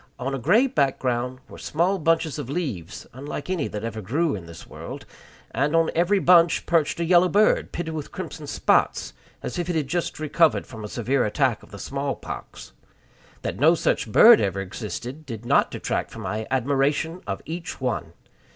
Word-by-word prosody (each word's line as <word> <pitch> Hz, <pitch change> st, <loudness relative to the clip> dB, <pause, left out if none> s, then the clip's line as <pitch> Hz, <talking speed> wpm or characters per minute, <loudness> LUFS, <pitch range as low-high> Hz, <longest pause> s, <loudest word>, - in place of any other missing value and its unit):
On 135 Hz, +2 st, -3 dB
a 135 Hz, -, -2 dB
gray 195 Hz, -, +4 dB
background 130 Hz, -, 0 dB
were -, -, -12 dB
small 180 Hz, +5 st, 0 dB
bunches 160 Hz, -2 st, +1 dB
of 120 Hz, -, -5 dB
leaves, 125 Hz, -, -4 dB
unlike 145 Hz, +6 st, -6 dB
any 175 Hz, -6 st, 0 dB
that 105 Hz, 0 st, -6 dB
ever 115 Hz, -1 st, -4 dB
grew 145 Hz, -, 0 dB
in 90 Hz, -5 st, -6 dB
this 85 Hz, 0 st, -11 dB
world; -, -, -9 dB, 0.5 s
and 145 Hz, +4 st, 0 dB
on 165 Hz, -1 st, +3 dB
every 175 Hz, +5 st, +3 dB
other 190 Hz, -, -2 dB
bunch 170 Hz, -2 st, +5 dB
perched 165 Hz, -1 st, +1 dB
a 170 Hz, -, 0 dB
yellow 175 Hz, +1 st, +5 dB
bird, 210 Hz, +3 st, +3 dB
pitted 165 Hz, -2 st, -4 dB
with 155 Hz, -2 st, -5 dB
crimson -, -, -7 dB
spots, -, -, +1 dB, 0.3 s
as 150 Hz, -, -4 dB
if 175 Hz, 0 st, -2 dB
it 175 Hz, -, 0 dB
had 150 Hz, -4 st, 0 dB
just 175 Hz, +1 st, -2 dB
recovered 155 Hz, +1 st, +2 dB
from 110 Hz, -3 st, -9 dB
a -, -, -4 dB
severe 125 Hz, +4 st, 0 dB
attack 120 Hz, +1 st, +1 dB
of -, -, -17 dB
the 100 Hz, -, -10 dB
small 140 Hz, +5 st, -3 dB
pox. -, -, -9 dB, 0.7 s
That -, -, -3 dB
no -, -, +6 dB
such -, -, 0 dB
bird -, -, +8 dB
ever 100 Hz, -1 st, -1 dB
existed 115 Hz, +8 st, -6 dB
did 115 Hz, -5 st, -8 dB
not -, -, +3 dB
detract -, -, -3 dB
from -, -, -9 dB
my 110 Hz, +1 st, -3 dB
admiration 140 Hz, +6 st, 0 dB
of 100 Hz, -1 st, -4 dB
each 165 Hz, +3 st, -6 dB
one. 110 Hz, -11 st, -2 dB
140 Hz, 190 wpm, -24 LUFS, 120-165 Hz, 0.7 s, bird